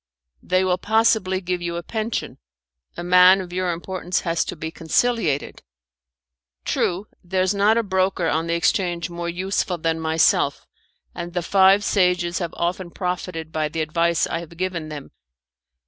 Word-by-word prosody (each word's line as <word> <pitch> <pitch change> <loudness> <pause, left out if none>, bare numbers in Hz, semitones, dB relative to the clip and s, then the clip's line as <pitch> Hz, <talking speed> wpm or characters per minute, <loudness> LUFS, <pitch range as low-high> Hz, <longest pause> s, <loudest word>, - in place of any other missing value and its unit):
"They 185 +1 +1
will 180 -1 +1
possibly 220 -4 +2
give 180 -1 -2
you 170 -1 -3
a 170 - -4
pension. 220 +3 -4 0.6
A 175 - -4
man 180 +2 +6
of 180 -2 -7
your 185 -1 0
importance 180 +1 -3
has 165 -1 0
to - - -5
be 160 0 -6
conciliated." 165 - 0 1.0
"True, 180 +4 0 0.2
there's 185 +1 0
not 205 +3 +3
a 230 - +2
broker 190 -3 0
on 160 +1 0
the 170 - 0
exchange 175 0 0
more 170 0 -4
useful 180 0 -1
than 165 0 -1
myself, 160 0 +2 0.5
and 175 0 -7
the 175 - -1
five 195 +3 +5
sages 180 -3 +1
have 170 -3 -4
often 175 +1 -2
profited 180 -3 -4
by 155 -1 -1
the 160 +1 -3
advice 165 +1 +1
I 165 - -3
have 170 0 -11
given 175 -4 -3
them. 145 -2 -8
180 Hz, 160 wpm, -22 LUFS, 170-190 Hz, 1.0 s, man